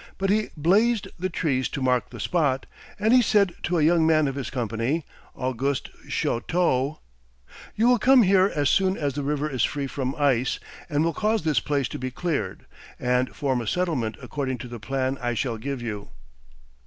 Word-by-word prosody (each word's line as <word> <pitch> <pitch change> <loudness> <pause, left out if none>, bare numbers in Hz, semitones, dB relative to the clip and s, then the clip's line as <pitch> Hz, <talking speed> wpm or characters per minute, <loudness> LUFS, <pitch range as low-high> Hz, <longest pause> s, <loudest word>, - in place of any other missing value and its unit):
But 195 0 0
he 215 +1 +1
"blazed" 205 +8 +2
the 185 +1 -1
trees 135 -6 0
to - - -4
mark 125 -2 +1
the - - -10
spot, 145 -7 0 0.3
and 220 +3 +3
he 255 - +7
said 200 -5 +3
to 175 +1 0
a 155 - +3
young 165 +1 +4
man 155 -2 +4
of 135 - -2
his 135 -3 -4
company, 120 +5 -2 0.3
Auguste 130 +1 -2 0.2
Chouteau: 140 +1 0 0.8
"You 225 +3 +3
will 245 -1 +5
come 260 0 +6
here 190 0 +4
as 145 -2 +2
soon 190 +5 +2
as 145 -3 -1
the 145 - -3
river 145 +1 -1
is 130 -6 -1
free 145 -1 -1
from 135 0 -3
ice, 135 -4 +1 0.3
and 150 0 +1
will 165 0 +1
cause 215 -2 0
this 155 -2 +2
place 140 -3 -1
to - - -6
be 130 0 -3
cleared, 160 +4 -3 0.3
and 125 +1 0
form 130 -4 0
a 115 - -6
settlement 145 -9 -1
according 130 0 -3
to 125 +2 -8
the 120 -1 -8
plan 130 +4 -2
I 120 -1 -1
shall 120 -2 -1
give 135 +1 -4
you." 105 -3 -5
145 Hz, 190 wpm, -25 LUFS, 130-175 Hz, 0.8 s, he